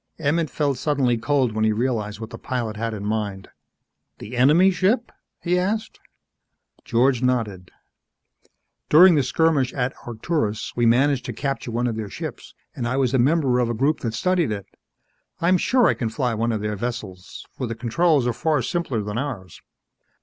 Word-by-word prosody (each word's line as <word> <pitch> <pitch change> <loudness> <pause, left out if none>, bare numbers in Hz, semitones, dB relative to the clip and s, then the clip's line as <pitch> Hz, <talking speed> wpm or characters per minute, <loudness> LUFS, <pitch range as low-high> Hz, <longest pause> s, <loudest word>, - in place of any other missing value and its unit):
Emmett 160 +1 0
felt 140 -4 -1
suddenly 135 -5 +1
cold 125 +2 +1
when 110 0 -1
he 110 - +3
realized 110 -2 -2
what 115 +1 -8
the - - -8
pilot 120 -4 -3
had 115 +2 -3
in 105 -2 -6
mind. 105 -3 -3 0.7
"The 115 +4 -8
enemy 155 +10 +5
ship?" 200 +7 +1 0.3
he 180 +1 +1
asked. 215 +4 -2 0.8
George 125 +1 +2
nodded. 110 -8 -1 1.2
"During 175 +4 +8
the 150 - +3
skirmish 140 -1 +1
at 125 -1 -1
Arcturus, 110 -2 -2
we 120 -1 +2
managed 130 +3 +3
to - - -4
capture 135 -3 -3
one 120 +1 -1
of 115 -2 -2
their 110 -2 -4
ships - - -8 0.2
and 120 - -3
I 125 +2 -1
was 130 -2 +1
a 130 - +3
member 135 -1 +2
of 120 -1 +1
a 120 - -1
group 140 +7 +1
that 115 -2 -3
studied 180 +1 +1
it. 100 -2 -4 0.7
I'm 180 +2 +3
sure 250 +4 +3
I - - +3
can 115 - -3
fly 120 +2 -1
one 115 +2 0
of 110 -2 -2
their 105 0 -2
vessels, 105 -5 -6
for 130 - -3
the 115 - -4
controls 140 +4 +1
are 120 - 0
far 150 0 0
simpler 135 -8 -2
than 105 +2 -3
ours. 110 - -6
125 Hz, 180 wpm, -23 LUFS, 110-150 Hz, 1.2 s, During